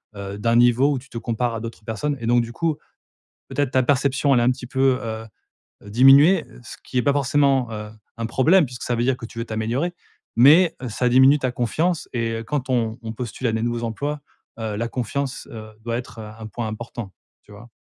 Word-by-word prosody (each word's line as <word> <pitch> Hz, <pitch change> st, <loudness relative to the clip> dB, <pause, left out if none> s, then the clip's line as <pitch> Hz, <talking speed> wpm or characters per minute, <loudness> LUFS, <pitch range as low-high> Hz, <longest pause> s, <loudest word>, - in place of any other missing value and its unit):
heu, 100 Hz, 0 st, -6 dB
d'un 115 Hz, +2 st, +1 dB
niveau 120 Hz, +4 st, +4 dB
où -, -, -1 dB
tu 135 Hz, +1 st, -18 dB
te 115 Hz, -, -8 dB
compares 120 Hz, +1 st, -2 dB
à -, -, -3 dB
d'autres 115 Hz, -2 st, -8 dB
personnes 135 Hz, +6 st, -2 dB
et 115 Hz, -, -6 dB
donc, 120 Hz, 0 st, +4 dB
du 115 Hz, 0 st, -8 dB
coup, 160 Hz, 0 st, -1 dB, 0.7 s
peut-être 145 Hz, -3 st, 0 dB
ta 130 Hz, -1 st, +3 dB
perception 140 Hz, +1 st, +2 dB
elle -, -, +4 dB
a -, -, +2 dB
un 125 Hz, -, +4 dB
petit 125 Hz, -1 st, -7 dB
peu, 130 Hz, 0 st, +2 dB
heu, 110 Hz, 0 st, -5 dB, 0.6 s
diminué. 135 Hz, -, +6 dB
Heu, -, -, -16 dB
ce -, -, -9 dB
qui 125 Hz, -, -3 dB
est -, -, +2 dB
pas 140 Hz, -, +3 dB
forcément, 140 Hz, -3 st, +2 dB
heu, 105 Hz, 0 st, -6 dB, 0.3 s
un 115 Hz, -, -2 dB
problème 155 Hz, +8 st, +4 dB
puisque 125 Hz, -1 st, -10 dB
ça 120 Hz, -, -1 dB
veut 120 Hz, -, 0 dB
dire 130 Hz, 0 st, +1 dB
que 115 Hz, -, -8 dB
tu 115 Hz, -, -12 dB
veux 115 Hz, -, -2 dB
t'améliorer. 120 Hz, +11 st, -2 dB, 0.4 s
Mais, 155 Hz, +8 st, +6 dB
heu, 125 Hz, -, -3 dB
ça 125 Hz, +3 st, 0 dB
diminue 130 Hz, +3 st, +6 dB
ta 130 Hz, -2 st, -1 dB
confiance 155 Hz, -, -1 dB
et 115 Hz, -2 st, -1 dB
heu, -, -, -8 dB
quand 130 Hz, -1 st, -3 dB
on 115 Hz, -2 st, 0 dB
on 110 Hz, 0 st, -5 dB
postule 120 Hz, +2 st, -5 dB
à -, -, 0 dB
des 110 Hz, 0 st, -1 dB
nouveaux 120 Hz, 0 st, -2 dB
emplois, 145 Hz, +6 st, -3 dB, 0.4 s
heu, 110 Hz, -2 st, -3 dB
la 115 Hz, +2 st, -2 dB
confiance, 130 Hz, +3 st, -4 dB
heu, 110 Hz, -1 st, -9 dB
doit 115 Hz, 0 st, -2 dB
être, 120 Hz, -2 st, -7 dB
heu, 105 Hz, 0 st, -8 dB
un 110 Hz, -, -8 dB
point 110 Hz, 0 st, -4 dB
important. 110 Hz, -1 st, -7 dB, 0.3 s
Tu 105 Hz, -, -18 dB
vois? 110 Hz, +4 st, -13 dB
120 Hz, 230 wpm, -22 LUFS, 115-135 Hz, 0.7 s, diminué